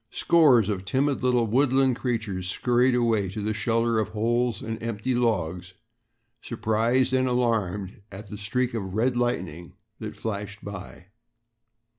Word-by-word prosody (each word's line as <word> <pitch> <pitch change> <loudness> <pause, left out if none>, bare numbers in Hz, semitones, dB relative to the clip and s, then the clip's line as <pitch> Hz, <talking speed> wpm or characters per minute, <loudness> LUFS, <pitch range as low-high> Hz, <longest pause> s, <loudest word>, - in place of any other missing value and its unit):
Scores 135 - +4
of 100 -3 -2
timid 135 +8 0
little 125 -2 +2
woodland 130 +2 +3
creatures 110 -8 -3
scurried 125 +4 +2
away 115 -5 +1
to 100 +4 -6
the 105 +1 -1
shelter 115 +1 +1
of 110 - 0
holes 115 +1 0
and 110 0 -5
empty 115 +2 -2
logs, 95 -7 -1 0.7
surprised 115 +3 +1
and 130 0 +2
alarmed 105 -6 -1
at 100 +2 -9
the 105 - -8
streak 125 +4 -1
of 95 -4 -4
red 120 +3 +1
lightning 90 -9 -2 0.3
that - - -6
flashed 100 -1 -5
by. 95 -2 -9
115 Hz, 140 wpm, -26 LUFS, 100-125 Hz, 0.7 s, Scores